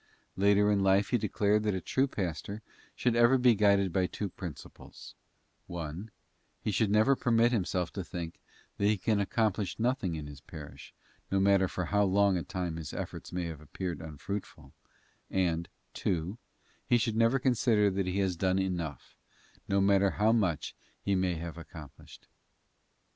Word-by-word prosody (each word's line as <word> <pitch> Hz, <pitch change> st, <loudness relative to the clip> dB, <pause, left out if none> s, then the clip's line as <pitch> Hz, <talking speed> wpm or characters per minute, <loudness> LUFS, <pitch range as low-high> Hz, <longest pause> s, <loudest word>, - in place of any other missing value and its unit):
Later 100 Hz, +2 st, +4 dB
in 100 Hz, -, +3 dB
life 95 Hz, +1 st, +3 dB
he 120 Hz, -, +2 dB
declared 105 Hz, +1 st, +1 dB
that 105 Hz, -2 st, 0 dB
a -, -, -1 dB
true 130 Hz, -, +1 dB
pastor 100 Hz, -, -4 dB, 0.3 s
should 125 Hz, -2 st, +1 dB
ever 120 Hz, +3 st, +5 dB
be 125 Hz, -1 st, +5 dB
guided 100 Hz, -3 st, +3 dB
by 95 Hz, -1 st, +2 dB
two 100 Hz, +1 st, -4 dB
principles: 85 Hz, -3 st, -10 dB, 0.5 s
(1), 85 Hz, +4 st, -6 dB, 0.5 s
he 105 Hz, -, -2 dB
should 110 Hz, 0 st, +1 dB
never 110 Hz, +6 st, +4 dB
permit 120 Hz, -1 st, +3 dB
himself 90 Hz, -6 st, -1 dB
to 95 Hz, -, -4 dB
think 85 Hz, -2 st, -6 dB, 0.4 s
that 100 Hz, -, +3 dB
he 105 Hz, 0 st, +3 dB
can 105 Hz, +3 st, +1 dB
accomplish 105 Hz, -1 st, 0 dB
nothing 115 Hz, -7 st, 0 dB
in 75 Hz, -2 st, -5 dB
his 70 Hz, -2 st, -10 dB
parish, 75 Hz, -1 st, -11 dB, 0.4 s
no 95 Hz, -, +1 dB
matter 95 Hz, -1 st, +4 dB
for 90 Hz, 0 st, -3 dB
how 105 Hz, +4 st, +2 dB
long 100 Hz, 0 st, +3 dB
a 90 Hz, -, 0 dB
time 90 Hz, -3 st, -4 dB
his 80 Hz, -4 st, -6 dB
efforts -, -, -6 dB
may 90 Hz, -1 st, -2 dB
have 80 Hz, -3 st, -6 dB
appeared 85 Hz, +2 st, -5 dB
unfruitful 80 Hz, -2 st, -7 dB, 0.6 s
and, 85 Hz, -3 st, 0 dB, 0.2 s
(2), 90 Hz, +6 st, -2 dB, 0.5 s
he 120 Hz, -, +4 dB
should 115 Hz, -1 st, 0 dB
never 115 Hz, +3 st, +4 dB
consider 120 Hz, -5 st, +3 dB
that 95 Hz, 0 st, -1 dB
he 90 Hz, +1 st, -1 dB
has 95 Hz, -2 st, +1 dB
done 95 Hz, +2 st, +1 dB
enough, 85 Hz, -7 st, -3 dB, 0.5 s
no 100 Hz, 0 st, +3 dB
matter 100 Hz, 0 st, +4 dB
how 105 Hz, +3 st, +2 dB
much 95 Hz, -10 st, 0 dB, 0.3 s
he 100 Hz, -, -1 dB
may 95 Hz, -2 st, +1 dB
have 85 Hz, +1 st, -6 dB
accomplished. 80 Hz, -3 st, -12 dB
95 Hz, 165 wpm, -30 LUFS, 85-105 Hz, 0.6 s, ever